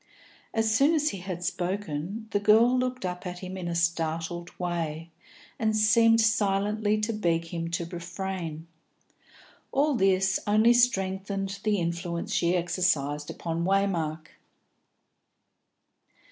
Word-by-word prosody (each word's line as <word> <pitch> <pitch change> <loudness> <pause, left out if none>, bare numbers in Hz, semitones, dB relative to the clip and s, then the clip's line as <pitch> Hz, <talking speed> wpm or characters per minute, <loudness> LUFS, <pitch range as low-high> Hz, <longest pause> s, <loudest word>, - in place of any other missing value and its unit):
As 225 -1 +1
soon 285 +7 +4
as 300 -1 +2
he 195 - -6
had 180 -1 -6
spoken, 185 +2 -3
the 205 - +1
girl 220 +4 +5
looked 255 -3 -1
up 180 +1 -4
at 180 0 -5
him 185 +1 -7
in 185 -2 -5
a 170 - -2
startled 170 0 -1
way, 165 -2 -3 0.5
and 220 -1 +1
seemed 225 +1 +5
silently 215 -1 +1
to 225 +2 -1
beg 170 -5 0
him 165 -1 -4
to 170 0 -2
refrain. 170 -1 -5 1.1
All 290 +2 +2
this 190 -4 +2
only 215 +3 +5
strengthened 195 -4 0
the 210 0 +1
influence 170 +3 -3
she 175 0 +2
exercised 155 -5 0
upon 165 0 -3
Waymark. 170 -5 0
190 Hz, 125 wpm, -27 LUFS, 170-215 Hz, 1.1 s, girl